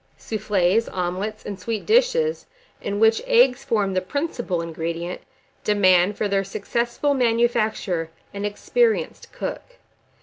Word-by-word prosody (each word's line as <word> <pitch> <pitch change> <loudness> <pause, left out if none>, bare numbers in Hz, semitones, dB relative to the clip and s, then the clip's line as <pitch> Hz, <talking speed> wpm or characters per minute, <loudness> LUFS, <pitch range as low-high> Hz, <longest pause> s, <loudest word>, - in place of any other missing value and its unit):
1388. 210 -2 +1
SOUFFLES, 195 - -11
OMELETS, 185 +4 -3
AND 200 -2 -6
SWEET 220 +2 -3
DISHES, 480 0 +2 0.4
in 200 0 -3
which 225 0 +4
eggs 250 +2 +4
form 210 -7 0
the 185 - +1
principal 240 - -2
ingredient, 165 +1 -4 0.4
demand, 190 -1 +4
for 210 - 0
their 195 -1 +1
successful 235 +8 -1
manufacture, 225 -8 +1 0.2
an 200 0 -5
experienced 445 - 0
cook. - - -6
210 Hz, 125 wpm, -23 LUFS, 185-240 Hz, 0.4 s, which